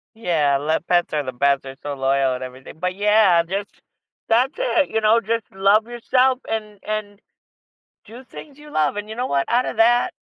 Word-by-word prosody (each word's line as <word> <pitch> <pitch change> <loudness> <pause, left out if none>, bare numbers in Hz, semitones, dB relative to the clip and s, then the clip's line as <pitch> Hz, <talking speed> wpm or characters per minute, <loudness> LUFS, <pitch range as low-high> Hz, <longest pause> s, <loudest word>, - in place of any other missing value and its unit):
Yeah, 155 -9 +1
le 155 +3 -1
pets 175 -1 0
are 150 -1 0
the 130 - -5
best. 140 +2 +1
They're 135 0 -9
so 145 -1 -4
loyal 135 -1 +1
and 130 - -6
everything. 130 +3 -10
But 180 +1 -2
yeah, 205 -4 +4
just 195 +4 -4 0.6
that's 250 +6 +2
it, - - +1
you 220 - 0
know, 220 +2 +4
just 230 +1 -2
love 200 +3 +3
yourself 255 +2 +1
and 215 -2 -4
and 210 -1 -5 0.8
do 240 +4 -12
things 285 +2 -12
you 300 0 -14
love 155 - 0
and 210 +1 -5
you 220 - -7
know 250 +1 -2
what, 140 0 0
out 245 +2 +1
of - - -4
that. 240 +2 +4
205 Hz, 200 wpm, -21 LUFS, 150-230 Hz, 0.8 s, yeah